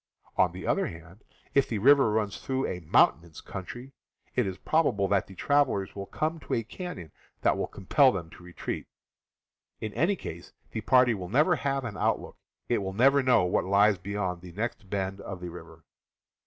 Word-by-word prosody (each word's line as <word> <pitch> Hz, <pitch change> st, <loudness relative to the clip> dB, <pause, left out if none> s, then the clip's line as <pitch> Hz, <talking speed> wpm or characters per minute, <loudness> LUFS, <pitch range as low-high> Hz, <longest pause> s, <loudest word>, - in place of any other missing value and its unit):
On -, -, +3 dB
the -, -, -8 dB
other -, -, +1 dB
hand, 85 Hz, +7 st, -12 dB, 0.3 s
if 140 Hz, -, +3 dB
the 110 Hz, -, -1 dB
river 135 Hz, +3 st, +6 dB
runs 105 Hz, -2 st, -1 dB
through 135 Hz, 0 st, -1 dB
a 90 Hz, -, -3 dB
mountainous 80 Hz, 0 st, +2 dB
country, 120 Hz, +8 st, -8 dB, 0.4 s
it 125 Hz, -5 st, +1 dB
is 95 Hz, -1 st, -4 dB
probable 125 Hz, -12 st, +1 dB
that 100 Hz, -2 st, +2 dB
the 95 Hz, -, -12 dB
travelers 140 Hz, -9 st, +1 dB
will 100 Hz, -1 st, -6 dB
come 160 Hz, +1 st, -2 dB
to -, -, -3 dB
a 115 Hz, -, -1 dB
canon 110 Hz, -, -7 dB, 0.3 s
that -, -, +3 dB
will -, -, -2 dB
compel 130 Hz, +8 st, +3 dB
them 85 Hz, -7 st, -5 dB
to -, -, -14 dB
retreat. 90 Hz, 0 st, -6 dB, 0.9 s
In 110 Hz, -2 st, -5 dB
any 170 Hz, -, +2 dB
case, -, -, -9 dB, 0.2 s
the 110 Hz, -, -3 dB
party 125 Hz, +1 st, +4 dB
will 90 Hz, -4 st, -6 dB
never 150 Hz, -, +4 dB
have 135 Hz, -2 st, -1 dB
an 110 Hz, -, -5 dB
outlook; -, -, -1 dB, 0.3 s
it -, -, +1 dB
will 95 Hz, -1 st, -4 dB
never 135 Hz, +6 st, +5 dB
know 130 Hz, -7 st, +4 dB
what 90 Hz, -, +1 dB
lies 100 Hz, 0 st, +4 dB
beyond 95 Hz, -2 st, -3 dB
the 90 Hz, -1 st, -11 dB
next 105 Hz, -1 st, -4 dB
bend 95 Hz, 0 st, -3 dB
of 95 Hz, -2 st, -7 dB
the 90 Hz, -1 st, -6 dB
river. 90 Hz, -, -12 dB
105 Hz, 190 wpm, -28 LUFS, 95-130 Hz, 0.9 s, river